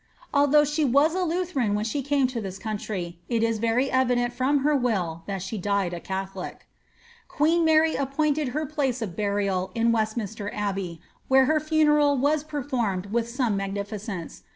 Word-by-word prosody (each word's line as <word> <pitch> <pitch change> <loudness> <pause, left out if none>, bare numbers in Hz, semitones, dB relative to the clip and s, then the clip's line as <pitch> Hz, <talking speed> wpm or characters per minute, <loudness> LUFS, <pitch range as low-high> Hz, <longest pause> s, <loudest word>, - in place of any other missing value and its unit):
Although 290 +1 +5
she 300 +2 0
was 285 +4 +4
a 370 - -1
Lutheran 335 - 0
when 210 +1 -1
she 255 +6 -1
came 280 0 +1
to 240 -3 -4
this 195 -2 -6
country, 195 -5 -5
it 230 -2 +1
is 230 -1 +1
very 230 +4 +1
evident 245 -2 +2
from 265 +3 +1
her 300 +1 +3
will 190 - -1
that 195 -3 -3
she 200 +2 -4
died 200 -2 0
a 175 - -4
catholic. 190 +2 -6 0.6
Queen 330 +3 +2
Mary 320 0 +4
appointed 290 +2 0
her 300 +5 -2
place 270 -5 -1
of 185 -6 -6
burial 200 -3 0
in 230 0 +3
Westminster 215 -2 -2
Abbey, 195 -5 -3 0.3
vhere 265 0 +6
her 310 +3 +2
funeral 300 -2 +3
was 290 +3 +2
performed 245 -11 -2
with 235 0 0
some 240 -3 0
magnificence. 195 -2 -5
240 Hz, 170 wpm, -25 LUFS, 200-290 Hz, 0.6 s, vhere